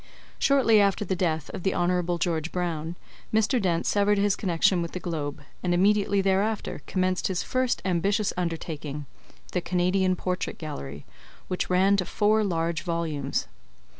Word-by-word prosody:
Shortly 255 Hz, -7 st, +5 dB
after 200 Hz, +1 st, +2 dB
the 190 Hz, -, -1 dB
death 160 Hz, -4 st, -1 dB
of -, -, -6 dB
the 190 Hz, -, 0 dB
Hon. 175 Hz, 0 st, +1 dB
George 165 Hz, -1 st, -1 dB
Brown, 170 Hz, -2 st, -2 dB, 0.4 s
Mr. 220 Hz, +3 st, +2 dB
Dent 170 Hz, -3 st, 0 dB
severed 205 Hz, 0 st, +3 dB
his 200 Hz, 0 st, +2 dB
connection 175 Hz, -1 st, +2 dB
with 170 Hz, -, -4 dB
the 180 Hz, -, -3 dB
Globe, 155 Hz, -4 st, -4 dB, 0.2 s
and 175 Hz, -1 st, +1 dB
immediately 200 Hz, +1 st, +3 dB
thereafter 195 Hz, +3 st, 0 dB
commenced 185 Hz, 0 st, 0 dB
his 185 Hz, -2 st, -1 dB
first 255 Hz, -1 st, 0 dB
ambitious 195 Hz, +3 st, +1 dB
undertaking, 155 Hz, -4 st, -4 dB, 0.5 s
The -, -, 0 dB
Canadian 185 Hz, +1 st, +1 dB
Portrait 180 Hz, +1 st, -3 dB
Gallery, 70 Hz, -, -7 dB, 0.4 s
which 180 Hz, -, -2 dB
ran 190 Hz, +2 st, +4 dB
to 185 Hz, -, 0 dB
four 215 Hz, +4 st, +2 dB
large 165 Hz, -4 st, -1 dB
volumes. 160 Hz, -5 st, -2 dB
180 Hz, 150 wpm, -26 LUFS, 165-200 Hz, 0.5 s, Shortly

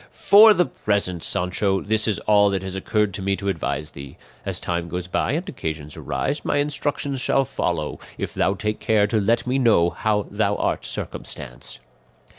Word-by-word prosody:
"For 215 Hz, +1 st, +7 dB
the 180 Hz, -, +3 dB
present, 100 Hz, -8 st, -1 dB
Sancho, 95 Hz, +3 st, 0 dB
this 110 Hz, +3 st, +1 dB
is 105 Hz, -, +1 dB
all 105 Hz, -1 st, +4 dB
that 95 Hz, -1 st, -2 dB
has 95 Hz, 0 st, -5 dB
occurred 105 Hz, +1 st, 0 dB
to 100 Hz, -, -4 dB
me 100 Hz, +1 st, 0 dB
to 100 Hz, 0 st, -3 dB
advise 75 Hz, -4 st, -3 dB
thee; 70 Hz, -1 st, -10 dB, 0.3 s
as -, -, -1 dB
time 85 Hz, -1 st, -3 dB
goes 90 Hz, +1 st, -4 dB
by 90 Hz, +7 st, -1 dB
and 170 Hz, +5 st, -2 dB
occasions 80 Hz, -, -5 dB
arise 140 Hz, +2 st, -3 dB
my -, -, 0 dB
instructions 145 Hz, -2 st, -1 dB
shall 135 Hz, -, +2 dB
follow, -, -, -2 dB, 0.2 s
if -, -, -4 dB
thou 100 Hz, -, +1 dB
take 105 Hz, +2 st, -2 dB
care 110 Hz, -2 st, +3 dB
to 105 Hz, +1 st, 0 dB
let 115 Hz, +3 st, +1 dB
me 130 Hz, +2 st, 0 dB
know 105 Hz, -9 st, +4 dB
how 105 Hz, -1 st, 0 dB
thou 105 Hz, 0 st, +1 dB
art -, -, -1 dB
circumstanced." -, -, -6 dB
105 Hz, 185 wpm, -23 LUFS, 90-120 Hz, 0.3 s, For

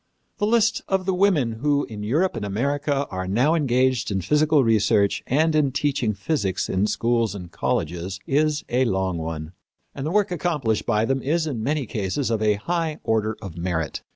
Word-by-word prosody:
The 210 Hz, -, +1 dB
list 230 Hz, 0 st, +2 dB
of 190 Hz, -1 st, 0 dB
the 190 Hz, -, +1 dB
women 180 Hz, -10 st, +2 dB
who 145 Hz, +1 st, +2 dB
in 105 Hz, -2 st, -8 dB
Europe 150 Hz, -, +1 dB
and 115 Hz, -, -4 dB
America 140 Hz, +7 st, -1 dB
are 95 Hz, 0 st, -3 dB
now 125 Hz, -, +2 dB
engaged 130 Hz, -5 st, +1 dB
in 100 Hz, -2 st, -1 dB
physical 150 Hz, -, +3 dB
research 105 Hz, -3 st, +2 dB
and 155 Hz, +5 st, +2 dB
in 150 Hz, -3 st, +2 dB
teaching 135 Hz, -6 st, 0 dB
physics 100 Hz, -, -1 dB
in 95 Hz, +3 st, +1 dB
schools 115 Hz, -1 st, 0 dB
and 90 Hz, -3 st, -8 dB
colleges 90 Hz, +5 st, -2 dB
is 150 Hz, +1 st, +1 dB
a 125 Hz, +2 st, +2 dB
long 95 Hz, -5 st, -1 dB
one, 80 Hz, -1 st, -5 dB, 0.4 s
and 135 Hz, -, -6 dB
the 155 Hz, -, -1 dB
work 205 Hz, +1 st, +1 dB
accomplished 150 Hz, -11 st, -1 dB
by 110 Hz, -1 st, +2 dB
them 135 Hz, +2 st, 0 dB
is, 160 Hz, +5 st, 0 dB
in 135 Hz, -8 st, -3 dB
many 145 Hz, +3 st, -1 dB
cases, 110 Hz, +5 st, -2 dB
of 110 Hz, -1 st, 0 dB
a 105 Hz, -1 st, +3 dB
high 160 Hz, +7 st, -2 dB
order 110 Hz, -1 st, 0 dB
of 85 Hz, -4 st, -7 dB
merit. 85 Hz, -3 st, -2 dB
125 Hz, 185 wpm, -23 LUFS, 100-150 Hz, 0.4 s, physical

